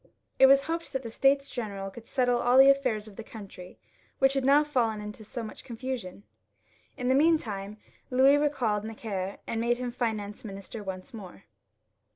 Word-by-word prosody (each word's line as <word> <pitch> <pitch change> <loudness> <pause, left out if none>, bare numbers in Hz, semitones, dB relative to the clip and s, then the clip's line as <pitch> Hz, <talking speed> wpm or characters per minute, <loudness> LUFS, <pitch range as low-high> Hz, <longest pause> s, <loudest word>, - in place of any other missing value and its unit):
It 265 - +9
was 275 +1 +6
hoped 330 +1 -4
that 265 0 -2
the 230 - -6
States 275 +3 +2
General 200 -5 -5
would 230 +1 -12
settle 245 -2 +1
all 245 +1 +3
tJie 270 +1 +9
alfairs 230 -6 -2
of 205 - -14
the 225 - -6
country, 195 -5 -11 0.4
which 270 0 +3
had 270 -1 0
now 280 +3 +5
fallen 240 -7 0
into 210 +1 -8
so 230 +3 -6
much 215 - -9
confusion. 235 -6 -6 0.7
In 250 - -3
the 260 - +4
meantime 220 -10 +1 0.3
Louis 265 +3 +5
recalled 250 -8 0
Necker, 205 -3 -5
and 225 - -2
made 240 +1 +1
him 250 -1 -4
Finance 215 -4 -3
Minister 200 +1 -8
once 190 +5 -7
more. 195 -3 -10
235 Hz, 180 wpm, -28 LUFS, 210-265 Hz, 0.7 s, It